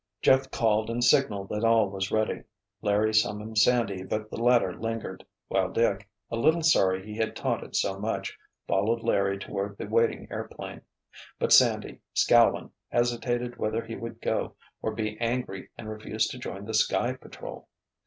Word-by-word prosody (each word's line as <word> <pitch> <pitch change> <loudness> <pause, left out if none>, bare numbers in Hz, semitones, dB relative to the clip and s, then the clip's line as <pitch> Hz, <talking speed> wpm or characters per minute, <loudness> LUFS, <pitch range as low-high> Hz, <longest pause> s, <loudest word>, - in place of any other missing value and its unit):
Jeff 130 0 +4
called 110 -2 +1
and 120 +1 -1
signaled 120 -7 +3
that 105 +1 -2
all 115 -2 +4
was 95 0 -3
ready. 110 0 0 0.4
Larry 105 +1 +2
summoned 110 0 +1
Sandy 110 -6 +3
but 110 +3 -4
the - - -5
latter 120 -6 +4
lingered, 115 -4 -5 0.2
while 95 -1 0
Dick, 100 -3 0 0.2
a - - -1
little 160 +8 +3
sorry 95 -11 +3
he 105 0 -7
had 110 -1 -1
taunted - - -3
so 95 0 0
much, 110 +2 -3 0.3
followed 110 +4 +1
Larry 100 0 +1
toward 100 +1 -4
the - - -5
waiting 115 +2 +1
airplane. - - -6 0.6
But - - +2
Sandy, - - +4
scowling, - - +4 0.2
hesitated 120 0 0
whether 110 +2 -1
he 115 - -7
would 115 0 -7
go - - -1 0.3
or 110 - -1
be 110 -1 -3
angry 115 -5 -2
and 110 - -8
refuse 110 0 -2
to - - -7
join 95 +2 -6
the 110 - -5
Sky 120 +3 +2
Patrol. 130 - -10
110 Hz, 165 wpm, -27 LUFS, 100-115 Hz, 0.6 s, Jeff